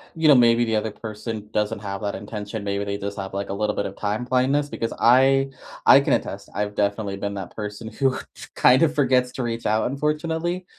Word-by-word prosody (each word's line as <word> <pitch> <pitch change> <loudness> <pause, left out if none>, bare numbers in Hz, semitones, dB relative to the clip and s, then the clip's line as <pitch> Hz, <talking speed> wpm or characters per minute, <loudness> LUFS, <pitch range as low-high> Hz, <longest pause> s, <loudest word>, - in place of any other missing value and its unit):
you 160 -1 +2
know, 150 - +9
maybe 120 -2 +5
the 110 -1 0
other 110 +1 -1
person 110 0 -7
doesn't 105 -1 0
have 100 -1 -5
that 100 -1 -2
intention, 105 +1 -6
maybe 100 0 -2
they 100 0 -3
just 100 +1 -5
have, 95 0 -6
like, 100 0 -3
a - - -2
little 105 +1 -1
bit - - -1
of 100 - -6
time 105 +3 -2
blindness, 130 +3 +1
because 115 -5 -4
I 135 +3 +4 0.3
I - - +9
can - - +1
attest, - - -3
I've 105 0 -2
definitely 100 -1 -1
been 100 0 -4
that 95 -3 -7
person 105 +1 -6
who 130 +4 0 0.4
kind 125 +1 +5
of 155 -2 +3
forgets 130 -3 +2
to 130 - -3
reach 115 -1 -3
out, 110 +3 +1
unfortunately. 160 +5 -2
110 Hz, 215 wpm, -23 LUFS, 100-130 Hz, 0.4 s, know